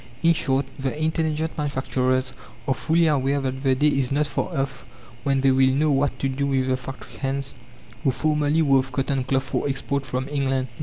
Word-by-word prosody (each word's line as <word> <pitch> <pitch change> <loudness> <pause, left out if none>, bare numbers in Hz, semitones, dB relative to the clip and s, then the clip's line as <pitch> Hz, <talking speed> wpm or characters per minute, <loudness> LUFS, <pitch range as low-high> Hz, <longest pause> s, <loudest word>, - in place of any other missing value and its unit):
In 165 0 +6
short, 135 -3 +1
the 135 +2 -2
intelligent 160 0 -1
manufacturers 130 -3 0 0.3
are 135 - +3
fully 165 +5 +2
aware 140 -2 +2
that 130 -1 -3
the 135 -1 +3
day 150 +3 +3
is 135 -3 0
not 145 +2 +2
far 150 +5 -2
off 135 -1 -2 0.4
when 135 -1 +1
they 135 0 +4
will 130 0 +4
not 130 - +2
know 155 +1 +3
what 140 +1 +1
to 135 - -1
do 135 +1 -1
with 130 -1 +1
the 130 - +3
"factory 130 +1 -9
hands" 135 0 -1 0.5
who - - +3
formerly 150 +3 +1
wove 135 -2 +3
cotton 135 0 0
cloth 130 +1 0
for 140 - -2
export 140 0 -2
from 130 +2 -2
England. 135 -2 0
135 Hz, 200 wpm, -24 LUFS, 130-145 Hz, 0.5 s, In